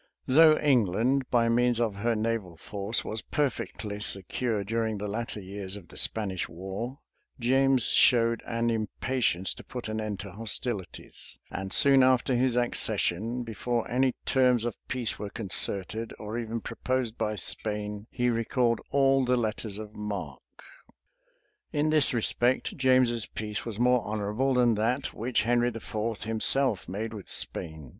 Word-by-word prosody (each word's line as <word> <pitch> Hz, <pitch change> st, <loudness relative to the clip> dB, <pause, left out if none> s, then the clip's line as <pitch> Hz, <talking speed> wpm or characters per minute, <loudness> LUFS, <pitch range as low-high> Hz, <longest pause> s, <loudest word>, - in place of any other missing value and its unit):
Though 155 Hz, +3 st, +6 dB
England, 125 Hz, 0 st, +2 dB
by 115 Hz, -2 st, +3 dB
means 120 Hz, 0 st, +2 dB
of 110 Hz, -4 st, 0 dB
her 115 Hz, +3 st, 0 dB
naval 110 Hz, -6 st, -2 dB
force, 100 Hz, +5 st, -2 dB
was 110 Hz, +1 st, -3 dB
perfectly 115 Hz, -7 st, -3 dB
secure 105 Hz, +2 st, 0 dB
during 110 Hz, +1 st, -1 dB
the 105 Hz, +1 st, -4 dB
latter 110 Hz, +1 st, -4 dB
years 95 Hz, 0 st, -6 dB
of 95 Hz, -5 st, -11 dB
the -, -, -14 dB
Spanish 95 Hz, -5 st, -1 dB
war, 95 Hz, +9 st, -6 dB, 0.4 s
James 130 Hz, 0 st, +3 dB
showed 115 Hz, -1 st, +4 dB
an 115 Hz, 0 st, 0 dB
impatience 110 Hz, -3 st, -1 dB
to -, -, -12 dB
put 125 Hz, -2 st, -7 dB
an 110 Hz, 0 st, -3 dB
end 105 Hz, -3 st, -4 dB
to 100 Hz, -, -8 dB
hostilities; 110 Hz, -1 st, -4 dB
and 95 Hz, 0 st, -5 dB
soon 135 Hz, +5 st, +6 dB
after 130 Hz, 0 st, +3 dB
his 125 Hz, 0 st, +2 dB
accession, 120 Hz, -1 st, 0 dB
before 115 Hz, +1 st, -2 dB
any 130 Hz, +1 st, +2 dB
terms 125 Hz, -3 st, +3 dB
of 120 Hz, -, -1 dB
peace 125 Hz, -3 st, -2 dB
were 105 Hz, -, -5 dB
concerted, 100 Hz, 0 st, 0 dB
or 105 Hz, +1 st, -6 dB
even 115 Hz, 0 st, -4 dB
proposed 130 Hz, -3 st, -2 dB
by 110 Hz, -2 st, -2 dB
Spain, 105 Hz, 0 st, -1 dB
he 125 Hz, -1 st, 0 dB
recalled 115 Hz, 0 st, 0 dB
all 135 Hz, -1 st, +3 dB
the 125 Hz, 0 st, +2 dB
letters 110 Hz, -2 st, -3 dB
of 105 Hz, -1 st, -9 dB
marque. 105 Hz, -1 st, -7 dB, 1.1 s
In 150 Hz, 0 st, +1 dB
this 155 Hz, -3 st, +4 dB
respect, 120 Hz, +1 st, 0 dB
James's 130 Hz, -4 st, +2 dB
peace 105 Hz, +1 st, -5 dB
was 110 Hz, -3 st, -5 dB
more 125 Hz, 0 st, +4 dB
honorable 110 Hz, +5 st, -1 dB
than 120 Hz, -2 st, +4 dB
that 115 Hz, +5 st, -1 dB
which 120 Hz, +1 st, -1 dB
Henry 120 Hz, +1 st, +2 dB
IV. 115 Hz, -1 st, -4 dB
himself 115 Hz, -1 st, +3 dB
made 110 Hz, +4 st, -4 dB
with 105 Hz, -4 st, -9 dB
Spain. 80 Hz, -5 st, -2 dB
115 Hz, 150 wpm, -28 LUFS, 105-125 Hz, 1.1 s, Though